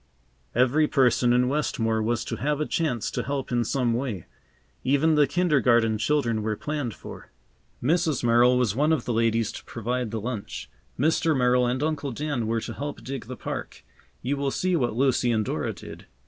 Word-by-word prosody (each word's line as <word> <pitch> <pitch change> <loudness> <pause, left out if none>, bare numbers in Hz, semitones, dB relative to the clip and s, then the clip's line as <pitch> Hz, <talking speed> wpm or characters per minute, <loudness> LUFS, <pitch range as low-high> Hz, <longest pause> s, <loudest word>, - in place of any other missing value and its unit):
Every 130 +6 +3
person 125 -3 +3
in 125 +1 +3
Westmore 115 -6 0
was 115 +1 -1
to - - -4
have 150 +1 -1
a 150 - 0
chance 145 -10 -1
to - - -2
help 140 -1 -3
in 120 -1 +2
some 120 0 0
way. 115 - -3 0.6
Even 145 +5 +3
the 150 -2 +4
kindergarten 125 -9 +2
children 115 -3 +1
were 105 0 -1
planned 145 -5 -3
for. - - -11 0.5
Mrs. 160 -1 +1
Merrill 120 +1 +5
was 120 -5 +1
one 150 +4 +2
of 155 -7 +1
the 120 - -1
ladies 115 -1 +1
to - - -9
provide 120 +1 -3
the 110 - -3
lunch. 105 - -5 0.3
Mr. 160 +1 +2
Merrill 125 0 +3
and 130 +3 -1
Uncle 150 -3 -1
Dan 140 -4 -2
were 115 0 0
to - - -5
help 145 0 -6
dig 135 -1 -5
the 125 +2 -7
park. - - -6 0.4
You 140 +3 -1
will 140 0 0
see 185 +6 0
what 120 -8 0
Lucy 125 -1 +2
and 110 -2 +1
Dora - - -2
did. - - -11
125 Hz, 190 wpm, -26 LUFS, 115-145 Hz, 0.6 s, Merrill